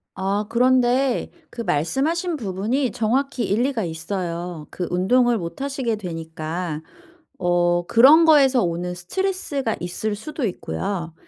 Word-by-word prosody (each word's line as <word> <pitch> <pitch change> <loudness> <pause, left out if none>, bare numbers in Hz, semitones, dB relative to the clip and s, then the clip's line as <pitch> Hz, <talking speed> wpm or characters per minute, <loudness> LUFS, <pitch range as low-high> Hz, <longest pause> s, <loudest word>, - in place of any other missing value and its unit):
아 195 +2 -1
그런데 250 +2 +2 0.2
그 235 - -5
말씀하신 275 - 0
부분이 230 +4 -1
정확히 245 +5 0
일리가 235 +2 0
있어요. 170 -1 -4
그 180 - -4
운동을 235 +7 +3
못 170 +8 -6
하시게 270 -5 -1
되니까 165 -3 -5 0.6
어 175 -1 +1
그런 280 +8 +7
거에서 275 -6 +5
오는 175 +1 -2
스트레스가 285 - -2
있을 180 +5 -3
수도 285 +5 -4
있고요. 170 - -4
210 Hz, 275 characters per minute, -22 LUFS, 175-260 Hz, 0.6 s, 그런